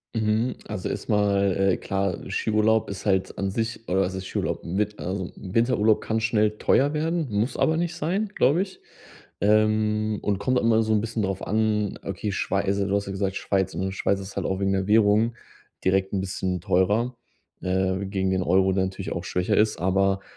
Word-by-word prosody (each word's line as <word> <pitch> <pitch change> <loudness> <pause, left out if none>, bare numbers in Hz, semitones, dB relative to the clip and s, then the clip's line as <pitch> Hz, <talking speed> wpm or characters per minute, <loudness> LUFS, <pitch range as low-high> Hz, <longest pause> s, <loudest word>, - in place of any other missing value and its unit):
Mhm, 110 +2 +1
also, - - -4
erst - - -5
mal, 100 -2 +2
äh, 95 -1 +2
klar, 95 -2 -1
Skiurlaub 110 0 +2
ist 100 -1 -7
halt 95 -2 0
an 100 -1 -1
sich 115 +1 -3
oder 95 +2 +2
was 95 0 -1
heißt 95 - -5
Skiurlaub? - - -3
Mit 105 +4 -1
also, 95 +1 -3
'n - - -9 0.2
Winterurlaub 115 -2 +3
kann 110 0 -1
schnell 110 -1 +1
teuer 145 +3 +3
werden, 165 0 0
muss 105 +5 -1
aber 160 0 +2
nicht 175 0 -1
sein, 190 +8 -1
glaube 155 +6 +3
ich. 190 - -12 0.6
Ähm, 110 0 +2
und 100 -2 0
kommt 130 +4 +1
immer 115 -1 +3
so 110 0 +1
'n 105 - +2
bisschen 115 0 -3
drauf 95 -1 -2
an, 105 -1 0
okay, 100 +2 -3
Schwei 100 +1 -1
also, 100 0 0
du 100 - 0
hast 100 - 0
ja 95 - -5
gesagt, 95 0 -2
Schweiz, 95 -2 -1
und 95 +1 -2
Schweiz 100 0 0
ist 95 0 -9
halt - - -2
auch 95 0 -2
wegen 95 0 +1
der 95 0 -1
Währung 110 +2 +4 0.5
direkt 95 0 +2
'n 95 -2 -1
bisschen 95 -1 -2
teurer, 105 +9 +1 0.5
äh, 95 0 0
gegen 95 -1 -1
den 95 -1 +1
Euro, 95 +2 +3
der 95 0 +1
natürlich 95 0 -5
auch 85 - -3
schwächer 90 0 0
ist. 110 0 +3
Aber 95 +2 +1
100 Hz, 200 wpm, -25 LUFS, 95-110 Hz, 0.6 s, Währung